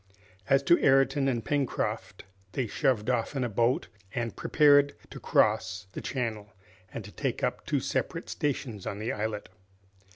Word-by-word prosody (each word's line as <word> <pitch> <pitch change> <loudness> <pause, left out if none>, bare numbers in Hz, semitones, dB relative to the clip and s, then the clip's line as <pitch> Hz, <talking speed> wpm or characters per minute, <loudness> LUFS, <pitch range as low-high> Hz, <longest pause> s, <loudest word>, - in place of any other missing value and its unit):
As 135 0 +4
to 170 - +4
Ayrton 135 0 +4
and 120 -4 -1
Pencroft, 140 -4 -2 0.3
they 130 - 0
shoved 110 0 0
off 125 +2 0
in 135 - 0
the 120 - -1
boat, 115 +4 +1 0.3
and 115 -1 -2
prepared 145 -2 +4 0.2
to - - -8
cross 95 +2 +1
the - - -5
channel 110 -5 -3 0.4
and 110 0 -6
to 105 - -10
take - - -3
up - - -2
two - - +1
separate - - -2
stations 125 -8 -3
on 100 - -3
the 110 +3 -2
islet. 105 -1 -3
125 Hz, 160 wpm, -29 LUFS, 110-135 Hz, 0.4 s, As